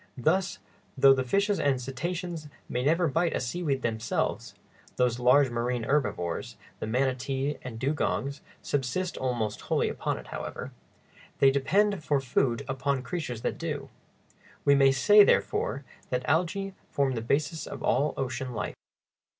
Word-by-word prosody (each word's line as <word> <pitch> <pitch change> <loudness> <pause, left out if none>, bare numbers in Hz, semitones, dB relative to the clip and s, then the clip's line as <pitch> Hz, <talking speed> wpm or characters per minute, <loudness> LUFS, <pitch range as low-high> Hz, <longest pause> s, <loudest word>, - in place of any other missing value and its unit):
Thus, 175 +9 +1 0.4
though 135 0 +8
the 130 -1 0
fishes 200 - +1
and 135 -3 +2
cetaceans 165 +5 -4 0.2
may 125 - -2
never 165 +5 +3
bite 165 +4 +1
a - - 0
seaweed 135 +1 -2
themselves 115 0 -2 0.4
(those 125 -1 +1
large 125 +2 +5
marine 120 0 -1
herbivores, 105 - -1 0.2
the - - -3
manatee 135 +3 -1
and 125 -3 -7
dugongs, 140 +1 -1 0.2
subsist 145 +7 -1
almost 120 -5 -2
wholly - - 0
upon - - -2
it, - - -11
however), - - -6 0.7
they 135 - +6
depend 195 +7 +2
for 145 -2 +2
food 130 0 0
upon 135 0 -1
creatures 130 -5 -4
that - - -2
do. - - -4 0.8
We 140 - +6
may 135 -1 +6
say, 205 +11 +7
therefore, 140 -7 +1 0.3
that 125 0 0
the - - -9
algæ 180 +5 0 0.2
form 140 -2 +1
the 115 - -2
basis 150 +7 -1
of - - -7
all 145 +2 +2
ocean 130 -1 -3
life. 105 - -3
135 Hz, 150 wpm, -28 LUFS, 125-155 Hz, 0.8 s, though